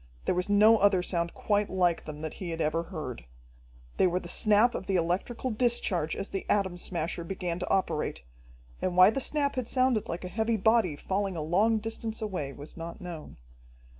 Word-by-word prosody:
There - - +2
was 180 +2 -1
no 215 +2 +6
other 195 -3 +4
sound 170 -2 -2
quite 205 -1 0
like 180 -3 +1
them 150 -1 -7
that 155 -1 -4
he 180 - -4
had 165 0 -4
ever 160 +1 +1
heard. 155 - -6 0.7
They - - +4
were 180 +1 0
the 175 - -10
snap 215 +6 +3
of 190 - -5
the 195 - 0
electrical 185 +9 -1
discharge 215 -8 0
as 195 - -5
the 195 - -3
Atom 190 -4 +1
Smasher 170 -1 -3
began 175 -1 -4
to 180 - -4
operate, 155 - 0 0.6
and 180 -1 -1
why 185 +3 +8
the 270 - -2
snap 285 -1 0
had 250 -3 -1
sounded 255 -4 +1
like 170 +2 -4
a - - -3
heavy 220 +4 0
body 220 -5 +3
falling 195 +4 -2
a 155 - -2
long 205 +8 +3
distance 225 +1 -5
away, 185 -10 -3
was 145 +2 -11
not 165 +2 -7
known. 175 -5 -8
185 Hz, 195 wpm, -29 LUFS, 170-215 Hz, 0.7 s, why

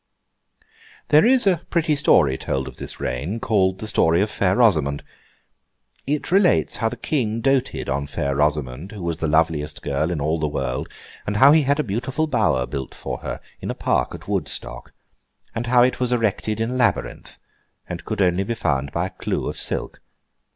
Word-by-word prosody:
There 155 +8 +6
is 255 -2 +4
a 180 -5 +3
pretty 165 -3 +1
story 75 - +4
told 65 0 -3
of - - -10
this - - -7
Reign, 85 - -3
called 95 -4 +1
the 110 - -6
story 85 -5 +3
of 105 - -3
Fair 95 -1 +1
Rosamond. 75 - +2 1.0
It 150 +3 -2
relates 190 -1 +3
how 115 - 0
the 125 - -7
King 115 -5 -1
doted 135 +1 0
on 70 +1 -2
Fair 70 -1 -2
Rosamond, 75 +3 -1
who 100 -4 -7
was 85 -2 -2
the 80 - -1
loveliest 80 -1 0
girl 75 +3 -1
in 85 -3 -2
all 80 +3 0
the 75 - 0
world; 65 -4 -3 0.4
and 105 +1 -1
how 135 +5 +8
he 155 +1 +6
had 140 +1 +1
a - - +2
beautiful 125 +8 -2
Bower 95 - +1
built 65 0 -6
for - - -5
her - - -5 0.2
in - - -6
a - - -2
Park - - 0
at - - -12
Woodstock; - - -4 0.6
and 120 +1 -3
how 120 0 +5
it 125 - +1
was 125 -1 0
erected 110 -2 0
in 115 +2 -1
a - - -3
labyrinth, 125 -2 -1 0.5
and - - -6
could 100 - -1
only 90 +1 +2
be 115 +4 -3
found 70 -9 -1
by 85 +2 -1
a - - -4
clue 95 - -3
of - - -4
silk. - - -4
100 Hz, 195 wpm, -22 LUFS, 75-125 Hz, 1.0 s, how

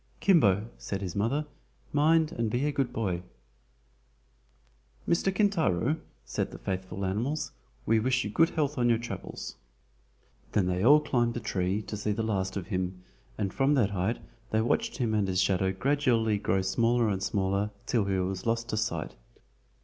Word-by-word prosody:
"Kimbo," 110 - +4
said 100 - -4
his 95 -4 -5
mother, 125 +9 0 0.5
"mind 160 +2 +4
and 115 -1 -1
be 120 +6 0
a 150 - +1
good 135 -3 -1
boy." 95 -6 -1 1.9
"Mr. 170 +3 +2
Kintaro," 160 - +2 0.3
said - - -2
the - - -9
faithful 95 0 -4
animals, 120 +11 -1 0.3
"we 115 0 +3
wish 125 +2 +1
you 105 - -4
good 165 +8 +4
health 145 -3 -1
on 120 0 +3
your 115 - +4
travels." 120 +1 -6 1.0
Then 100 - +3
they 90 +1 0
all 145 +6 +7
climbed 120 -5 0
a - - -1
tree 100 -2 -1
to 105 - -6
see 105 0 -1
the 115 - -2
last 95 -3 -1
of 95 - -4
him, 90 -1 -2 0.3
and 100 -3 -2
from 135 +2 +3
that 110 -7 +2
height 100 +4 0 0.3
they 110 - +1
watched 115 - 0
him 120 -5 0
and 105 -2 +2
his 90 -1 0
shadow 95 0 +2
gradually 115 -1 +1
grow 95 -2 +1
smaller 115 +4 +2
and 95 -3 -1
smaller, 100 +1 0 0.2
till 115 -5 +1
he 100 -1 0
was 95 +2 -2
lost 115 +1 0
to 110 - -1
sight. 85 -8 -2
110 Hz, 170 wpm, -29 LUFS, 95-125 Hz, 1.9 s, all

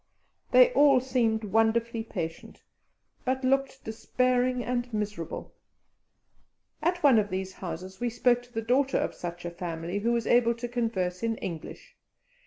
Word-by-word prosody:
They - - +7
all 285 - +6
seemed 235 -4 0
wonderfully 225 +2 +1
patient, 165 -7 -6 0.6
but 260 +1 -1
looked 270 +1 0
despairing 250 +2 0
and 245 0 -2
miserable. 210 -6 -4 1.3
At 350 +1 0
one 265 -6 +7
of 205 -1 -1
these 190 0 -4
houses 185 +2 -7
we 245 - 0
spoke 240 +1 +2
to 245 0 -20
the 225 -1 -3
daughter 260 +4 +2
of - - -1
such 175 0 -7
a 175 - -3
family 170 +1 -4
who 230 +3 0
was 235 -1 0
able 235 -1 +3
to 240 +1 -5
converse 225 -7 -2
in 225 -1 -1
English. 165 -4 -7
230 Hz, 150 wpm, -28 LUFS, 190-250 Hz, 1.3 s, They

